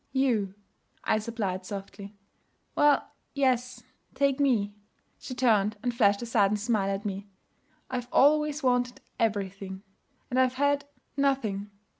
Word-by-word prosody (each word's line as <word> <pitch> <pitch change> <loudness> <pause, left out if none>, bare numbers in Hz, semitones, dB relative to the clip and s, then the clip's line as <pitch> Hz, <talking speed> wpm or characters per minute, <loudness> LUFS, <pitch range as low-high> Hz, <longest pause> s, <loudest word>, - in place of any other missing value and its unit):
'You,' 230 -8 +1 0.5
I 215 - +2
supplied 210 -4 -3
softly. 200 +1 -8 0.6
'Well, 295 -1 +4 0.3
yes, 255 -2 +1 0.3
take 280 0 +2
me.' 225 -8 +2 0.5
She 255 - -7
turned 215 -4 +2
and 245 -1 0
flashed 205 -2 +3
a - - -3
sudden 210 -3 +2
smile 210 -2 0
at 195 +2 -3
me. 200 0 -4 0.6
'I've 245 -1 -3
always 300 +1 +4
wanted 245 0 +1 0.2
everything, 195 -3 -2 0.5
and 255 - +2
I've 255 0 +3
had 285 +1 +1 0.3
nothing.' 235 -8 0
230 Hz, 125 wpm, -28 LUFS, 200-260 Hz, 0.6 s, Well